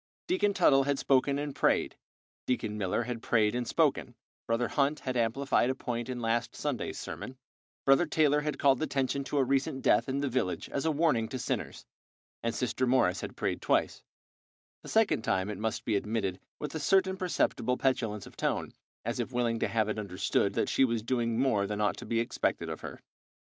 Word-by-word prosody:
Deacon 340 - +2
Tuttle 140 -8 +4
had 140 -1 +1
spoken 140 +1 +2
and 145 -1 -3
prayed, - - +1 0.5
Deacon 115 -4 -1
Miller 105 +3 -1
had 120 -1 -5
prayed 110 -3 +2
and 120 -1 -2
spoken, - - +1 0.3
Brother 115 +1 +1
Hunt 145 +1 +1
had 130 -1 -3
amplified 120 +2 +1
a 130 - 0
point 120 -2 -4
in 125 -1 -3
last 115 +1 -1
Sunday's 145 -5 -3
sermon, 130 - -7 0.5
Brother 135 +5 +5
Taylor 150 -1 +3
had 150 -1 -2
called 135 -1 +3
attention 140 -2 0
to 145 - -2
a 135 - +4
recent 135 +1 0
death - - +3
in 135 - -1
the 140 - 0
village 125 -8 -1
as 140 - -2
a - - +3
warning 145 -7 +2
to 130 - -5
sinners, 125 - -4 0.6
and 115 0 -2
Sister 125 +1 0
Morris 120 -8 +2
had - - -6
prayed - - -2
twice, - - +1 0.8
the - - -10
second 220 - +3
time 95 -2 0
it - - -6
must 110 0 -2
be 110 - +1
admitted, 100 -3 -1 0.2
with 150 -2 -5
a 160 - -3
certain 190 +5 +3
perceptible 170 - 0
petulance 115 -6 0
of - - -14
tone, - - -2 0.3
as 115 +1 -2
if 120 +2 -2
willing 120 -2 0
to - - +1
have 110 -2 +1
it 110 - -2
understood 95 -3 0
that - - +1
she - - +3
was 115 -4 +1
doing 115 -1 0
more 115 -6 +2
than 105 0 -3
ought 105 -1 +1
to - - -8
be 115 - +1
expected 115 - -1
of - - -6
her. - - -8
125 Hz, 200 wpm, -30 LUFS, 115-140 Hz, 0.8 s, Brother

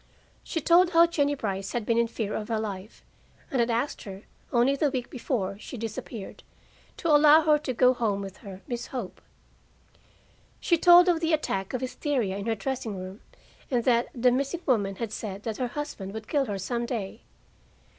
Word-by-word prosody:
She 325 - -3
told 350 +3 +4
how 335 +1 +7
Jennie 290 -4 0
Brice 195 -6 -4
had 235 -3 -2
been 230 +1 +2
in 235 - +2
fear 220 -2 -4
of 210 - -3
her 225 -2 -1
life, 205 -1 -7 0.5
and 265 - 0
had 235 0 +2
asked 240 +5 -1
her, 195 0 -9 0.3
only 245 +3 +3
the 290 +1 +1
week 255 -3 -4
before 205 -6 -3
she 250 - -8
disappeared, 220 -1 -7 0.6
to 335 - -2
allow 300 +1 +7
her 300 -1 +4
to 290 -3 -3
go 250 +1 +4
home 220 -5 -1
with 195 -1 -7
her 195 -1 -10
Miss 240 -2 -4
Hope. 240 -8 -6 1.4
She 345 - +2
told 350 +2 +7
of 345 -2 +3
the 325 0 0
attack 195 -8 -1
of 250 - -3
hysteria 255 -5 -1
in 200 +2 -5
her 225 - +1
dressing 225 -2 -4
room, 185 +3 -8 0.5
and 245 -3 +1
that 240 -1 +3
the 250 0 +3
missing 275 +7 -1
woman 200 -7 +1
had 225 +1 -4
said 205 -2 -6
that 220 -2 -4
her 250 - -1
husband 235 -8 -6
would 220 0 -7
kill 285 -3 +1
her 205 -4 -3
some 235 +5 -3
day. 215 -6 -4
235 Hz, 195 wpm, -27 LUFS, 205-280 Hz, 1.4 s, how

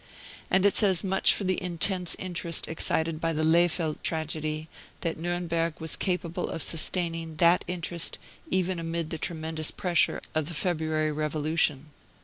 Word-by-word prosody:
And 190 +1 +3
it 200 - +4
says 190 -6 +5
much 190 0 +3
for - - -4
the 185 -1 0
intense 180 0 +2
interest 175 -2 -1
excited 160 0 -1
by 165 0 0
the 155 0 -1
Lehfeldt 165 -1 +2
tragedy 155 -1 -2 0.3
that 165 -2 -2
Nuremberg 170 -1 -2
was 160 -1 -1
capable 180 -3 -2
of 165 - -2
sustaining 165 -1 +1
that 170 +2 +4
interest 175 -1 -2 0.3
even 185 -1 0
amid 165 -1 -3
the 160 - -4
tremendous 160 -1 -2
pressure 175 -3 +1
of 155 -2 0
the 170 - -5
February 155 -3 0
Revolution. 150 -1 0
165 Hz, 145 wpm, -27 LUFS, 155-175 Hz, 0.3 s, says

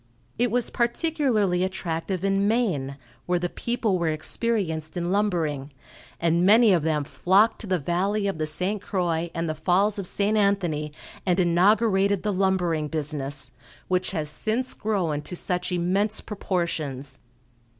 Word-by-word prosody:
It 245 0 +3
was 240 +1 0
particularly 235 - +1
attractive 185 -1 -3
in 195 +1 +2
Maine, 175 - 0 0.3
where 180 0 +2
the 175 0 -2
people 225 -5 -1
were 170 - 0
experienced 160 -1 -2
in 175 0 -1
lumbering, 165 -9 0 0.5
and 170 +1 +2
many 215 +2 +6
of 175 - +3
them 155 -1 0
flocked 195 +9 +2
to 215 - -7
the 185 -1 +1
Valley 190 +7 0
of 195 -5 -2
the 155 - 0
St. 185 +6 -2
Croix 170 -4 -1
and 165 0 -1
the 155 - -1
Falls 195 +6 +1
of 190 - -1
St. 205 +3 0
Anthony, 180 -8 +1 0.3
and 180 -1 +1
inaugurated 195 +2 +3
the 210 -1 0
lumbering 180 -5 +1
business, 145 -4 -3 0.4
which 185 0 +1
has 155 -5 -3
since 220 +11 -2
grown 180 -9 -1
to 180 - -7
such 180 +1 -2
immense 190 +5 0
proportions. 155 - -3
180 Hz, 150 wpm, -25 LUFS, 160-205 Hz, 0.5 s, many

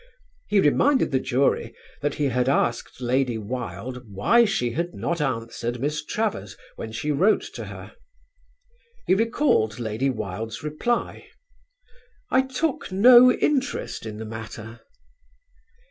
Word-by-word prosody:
He 210 - +3
reminded 260 - +3
the 130 - +2
jury 130 +1 0 0.3
that 145 0 -1
he 150 - -2
had 125 +1 +1
asked 120 -2 -1
Lady 125 -1 +1
Wilde 125 +3 -5
why 230 - +4
she 120 - 0
had 170 +7 -3
not 170 -2 -2
answered 120 -2 -3
Miss 150 +3 -2
Travers 150 - -3 0.2
when 110 - -7
she 115 +7 -2
wrote 185 +9 +3
to - - -6
her. - - -10 1.1
He - - +3
recalled 205 - +1
Lady 115 +3 -1
Wilde's 110 +2 -5
reply: 155 +11 -2 1.0
"I 260 - +5
took 265 -1 -2
no 245 +6 +8
interest 275 - -1
in 105 -1 -7
the 110 - -6
matter." 110 0 -8
130 Hz, 130 wpm, -24 LUFS, -, 1.1 s, no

